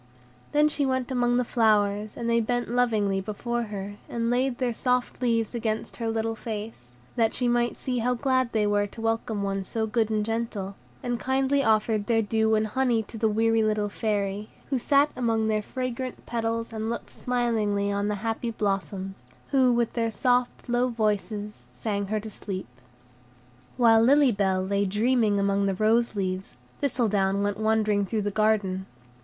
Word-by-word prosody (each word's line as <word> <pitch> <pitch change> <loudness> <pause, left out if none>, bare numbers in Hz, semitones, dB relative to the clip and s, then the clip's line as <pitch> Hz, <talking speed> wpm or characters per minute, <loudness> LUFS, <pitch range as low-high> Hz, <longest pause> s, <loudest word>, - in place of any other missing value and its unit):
Then 295 +1 +4
she 295 -1 -1
went 260 -1 -1
among 245 -1 +2
the 250 - +1
flowers, 210 -2 +2
and 235 - -3
they 235 0 +3
bent 245 +1 -1
lovingly 215 -6 +1
before 235 +4 -3
her, 205 -1 -6
and 230 0 -1
laid 250 0 +1
their 250 -2 0
soft 250 +2 -1
leaves 230 -2 +1
against 220 -2 -3
her 230 -2 -2
little 225 0 -1
face, 210 - -7 0.2
that 225 -2 +2
she 245 - +1
might 240 0 +1
see 250 -2 -2
how 250 +2 +1
glad 260 -1 +1
they 215 -2 +1
were 205 0 +2
to 205 - -13
welcome 225 -2 -1
one 195 0 -1
so 220 +4 -2
good 220 0 0
and 215 -1 0
gentle, 225 -3 -3 0.3
and 245 -1 -1
kindly 270 +1 +1
offered 215 -2 +2
their 225 -1 +3
dew 220 +1 +2
and 215 0 +2
honey 240 0 +1
to 225 - -10
the 220 - +2
weary 225 +1 +2
little 215 -1 +1
Fairy, 205 -1 -2 0.2
who 265 - +1
sat 285 +4 +3
among 225 -3 +1
their 215 -1 +1
fragrant 255 +2 -5
petals 230 0 -2
and 220 0 -3
looked 235 - -5
smilingly 220 -5 0
on 200 0 0
the 210 - 0
happy 225 +1 -1
blossoms, 195 -2 -3 0.3
who, 260 -3 +4
with 235 -1 +1
their 230 -1 0
soft, 245 +2 0
low 245 +1 +2
voices, 210 -2 -2
sang 205 -2 -3
her 215 +2 -1
to 215 +1 -8
sleep. 195 -2 -5 1.1
While 225 -2 +6
Lily 275 +2 +5
Bell 190 -3 +1
lay 200 +1 +1
dreaming 215 +1 +2
among 200 0 +1
the 195 - 0
rose 220 +3 +2
leaves, 190 -1 -3 0.2
Thistledown 205 -7 +1
went 205 0 -1
wandering 215 -2 +2
through 215 0 -1
the 205 - -1
garden. 200 -3 +1
225 Hz, 175 wpm, -26 LUFS, 205-240 Hz, 1.1 s, While